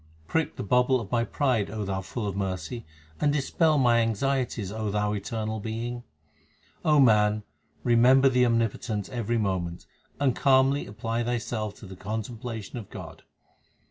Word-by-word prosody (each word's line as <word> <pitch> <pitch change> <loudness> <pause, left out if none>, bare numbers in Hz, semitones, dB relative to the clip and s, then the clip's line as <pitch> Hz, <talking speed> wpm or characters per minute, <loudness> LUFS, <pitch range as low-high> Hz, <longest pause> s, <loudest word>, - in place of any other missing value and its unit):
Prick 160 -1 0
the - - -4
bubble 125 +4 +3
of 110 -4 -8
my 120 -1 +2
pride, 125 -5 0
O 105 -1 -4
Thou 95 0 -2
full 105 +4 -5
of 100 -2 -3
mercy, 95 +2 -4 0.3
and 145 - +3
dispel 150 +2 +2
my 120 -3 +4
anxieties, 115 -2 0
O 110 0 -3
Thou 105 0 0
Eternal 110 +1 -3
Being. 115 +3 -4 0.8
O 150 -1 +4
man, 105 -4 +4 0.4
remember 125 +3 +5
the 125 -1 +4
Omnipotent 115 -3 -1
every 120 -2 -1
moment, 90 -5 -2 0.3
and 135 -3 +2
calmly 135 0 +3
apply 115 +3 -2
thyself 115 -3 -2
to - - -12
the 95 0 -9
contemplation 110 +3 -5
of 105 - -10
God. - - -9
115 Hz, 150 wpm, -27 LUFS, 105-125 Hz, 0.8 s, remember